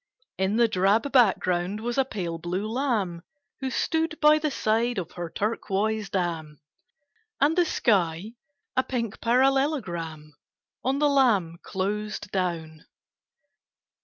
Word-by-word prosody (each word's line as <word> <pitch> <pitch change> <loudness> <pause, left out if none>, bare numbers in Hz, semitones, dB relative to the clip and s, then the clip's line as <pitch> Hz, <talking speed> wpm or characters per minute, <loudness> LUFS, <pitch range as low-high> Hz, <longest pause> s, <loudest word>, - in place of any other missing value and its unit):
In 190 +2 +1
the 235 0 +4
drab 210 +7 +2
background 190 -5 +2
was 240 +2 -3
a - - +5
pale 175 -10 -4
blue 180 +5 -3
lamb 220 -8 -1 0.4
Who 265 -2 -2
stood 320 +4 -1
by 305 0 +6
the 305 0 0
side 235 -1 0
of 175 -4 -4
her 175 -1 -6
turquoise 210 +1 -1
dam, 165 -5 -3 0.8
And 295 +3 +3
the 355 -1 +4
sky 195 - +1 0.4
a 260 - +4
pink 230 -5 -4
parallelogram 230 - 0 0.5
On 265 +2 +1
the 295 +1 +3
lamb 215 - +2
closed 210 +2 -3
down. 165 -4 -3
210 Hz, 125 wpm, -26 LUFS, 175-260 Hz, 0.8 s, by